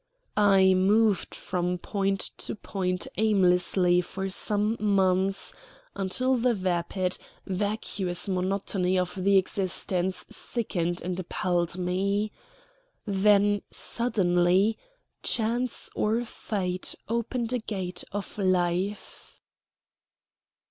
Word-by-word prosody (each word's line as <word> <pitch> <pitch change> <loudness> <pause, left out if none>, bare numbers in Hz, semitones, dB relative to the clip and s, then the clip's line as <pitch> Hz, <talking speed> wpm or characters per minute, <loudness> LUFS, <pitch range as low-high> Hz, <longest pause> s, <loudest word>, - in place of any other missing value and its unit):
I 195 -2 +5
moved 200 +2 +2
from 180 -1 -2
point 195 +1 -1 0.2
to - - -3
point 180 -4 -3
aimlessly 180 -3 +3
for 190 +2 -5
some 210 +3 0
months 195 -1 +2 0.4
until 255 +7 +1
the 240 0 +2
vapid, 185 0 -1 0.3
vacuous 190 -2 -1
monotony 185 0 0
of 180 -1 -1
the 195 +1 +3
existence 185 -1 0
sickened 175 -7 -2
and 180 +1 -3
appalled 175 -1 -1
me. 200 +4 0 0.7
Then 205 0 +3
suddenly 190 -2 +2 0.5
chance 235 +2 -1
or 225 +3 0
Fate 185 -5 -2
opened 235 +1 -2
a 250 - +1
gate 185 -5 -4
of 205 +1 -6
life. 185 +1 -1
190 Hz, 95 wpm, -27 LUFS, 180-210 Hz, 0.7 s, I